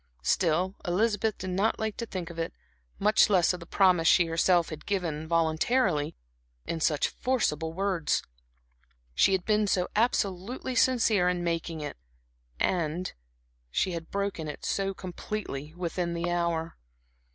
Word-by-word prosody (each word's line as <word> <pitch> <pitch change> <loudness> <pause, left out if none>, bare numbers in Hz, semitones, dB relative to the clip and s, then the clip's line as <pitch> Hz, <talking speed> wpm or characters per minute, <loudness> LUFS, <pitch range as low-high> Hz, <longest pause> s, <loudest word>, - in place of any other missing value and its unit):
Still, 175 - +2
Elizabeth 210 +3 +1
did 185 0 -5
not 195 +5 +1
like 220 -1 -2
to 235 - -4
think 180 -4 -5
of 165 - -8
it, 165 - -3 0.4
much 210 +2 +4
less 185 -3 +4
of 180 - -5
the 170 - -11
promise 180 -4 +4
she 175 - +6
herself 165 +1 +2
had 155 -1 -8
given, 165 -6 -2
voluntarily, 165 - +1 0.5
in 165 - -3
such 155 -2 +2
forcible 165 - 0
words. 185 -2 0 0.9
She 195 - +4
had 185 -2 0
been 210 -1 +2
so 180 -2 +1
absolutely 215 +2 0
sincere 230 -7 +3
in 180 -1 -1
making 165 -1 -2
it; 145 - -5 1.7
she 185 - 0
had 165 -1 -5
broken 200 -5 -2
it 150 - -7
so 195 -1 -1
completely 175 -5 -5
within 175 -1 -2
the 170 +1 -1
hour. 170 -1 -1
180 Hz, 140 wpm, -28 LUFS, 165-200 Hz, 1.7 s, she